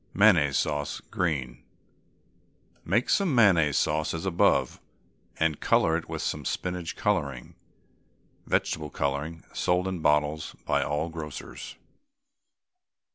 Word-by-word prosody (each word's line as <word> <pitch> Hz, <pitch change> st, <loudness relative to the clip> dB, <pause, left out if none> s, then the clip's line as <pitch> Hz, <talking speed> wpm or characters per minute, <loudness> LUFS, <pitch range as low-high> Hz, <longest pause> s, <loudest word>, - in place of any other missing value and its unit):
MAYONNAISE 85 Hz, -9 st, +5 dB
SAUCE, 75 Hz, -1 st, -1 dB
GREEN. 65 Hz, -8 st, -2 dB, 1.2 s
Make 110 Hz, +8 st, +1 dB
some 190 Hz, -9 st, +2 dB
mayonnaise 85 Hz, -, +4 dB
sauce 75 Hz, +1 st, 0 dB
as 80 Hz, -, -5 dB
above, 90 Hz, -3 st, +2 dB, 0.6 s
and 80 Hz, -2 st, +1 dB
colour 80 Hz, -, +3 dB
it 85 Hz, -, -4 dB
with -, -, -4 dB
some -, -, -2 dB
spinach 90 Hz, -2 st, -3 dB
colouring 70 Hz, -12 st, -1 dB, 0.9 s
(vegetable 75 Hz, -2 st, 0 dB
colouring, 70 Hz, +4 st, -3 dB
sold 90 Hz, +1 st, +1 dB
in 95 Hz, -2 st, -3 dB
bottles 75 Hz, 0 st, +1 dB
by -, -, +1 dB
all 75 Hz, +3 st, -1 dB
grocers). 80 Hz, -3 st, -8 dB
80 Hz, 110 wpm, -27 LUFS, 75-90 Hz, 1.2 s, MAYONNAISE